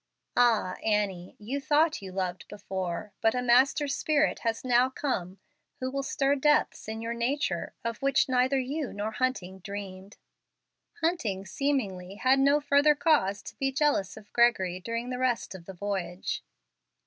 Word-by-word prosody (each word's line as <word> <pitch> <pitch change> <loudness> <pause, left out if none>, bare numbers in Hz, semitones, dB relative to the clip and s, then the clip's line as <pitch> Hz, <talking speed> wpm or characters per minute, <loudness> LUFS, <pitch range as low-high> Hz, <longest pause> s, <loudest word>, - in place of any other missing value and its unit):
Ah, 230 -6 +3
Annie! 200 -4 -1
you 255 +7 -4
thought 300 +2 +2
you 190 -1 -8
loved 185 -1 -3
before, 190 -1 -5
but 225 +2 +3
a 250 - 0
master 265 +4 +4
spirit 305 +2 +1
has 230 +1 -2
now 250 +1 +4
come 195 -10 -3 0.4
who 255 0 -3
will 275 +1 -1
stir 275 0 +1
depths 295 -3 +2
in 220 +1 -5
your 230 +1 -2
nature 235 - -1
of 230 -2 -3
which 275 0 +3
neither 255 +1 +2
you 270 +2 -2
nor 205 +2 -3
Hunting 215 -6 -2
dreamed. 200 0 -8 0.8
Hunting, 225 - -1
seemingly, 200 -10 -2
had 260 +5 +3
no 280 +2 +4
further 285 +1 +4
cause 285 - +2
to - - -9
be 270 -1 0
jealous 265 -10 +1
of 210 -1 -14
Gregory 190 -7 +3
during 230 +5 -4
the 250 - -3
rest 250 -5 0
of 180 -3 -10
the 195 - -7
voyage. 190 -2 -3
235 Hz, 160 wpm, -28 LUFS, 195-275 Hz, 0.8 s, master